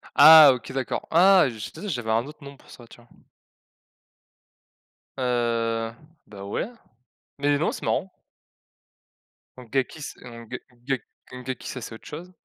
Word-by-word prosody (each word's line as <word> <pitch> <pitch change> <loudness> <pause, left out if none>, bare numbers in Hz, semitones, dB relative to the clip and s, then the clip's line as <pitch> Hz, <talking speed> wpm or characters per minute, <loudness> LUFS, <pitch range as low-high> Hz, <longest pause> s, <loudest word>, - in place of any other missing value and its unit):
Ah 155 0 +10
OK, 120 -2 -8
d'accord. 130 -2 -3
Ah, 185 +3 +6
je 120 - -9
tu - - -13
sais, 210 - -5
j'avais 120 -7 -3
un 115 +2 +1
autre 150 +1 -13
nom 140 0 -11
pour - - -22
ça, 120 - -13
tu - - -16
vois? 120 - -23 2.1
Heu, 115 -2 -1 0.4
ben, 100 -2 -11
ouais, 100 - -3 0.7
mais 145 0 +2
non, 155 - 0
c'est - - -8
marrant. 190 - -1 1.5
Donc 125 -3 -13
gaki 135 +3 -2
c'est - - -9
ongué 115 -2 -9
ongué 125 +1 -4 0.3
ongaki 125 0 -7
ça 125 - -6
c'est 110 - -8
autre - - -16
chose. 170 +5 -9
125 Hz, 155 wpm, -24 LUFS, 115-145 Hz, 2.1 s, Ah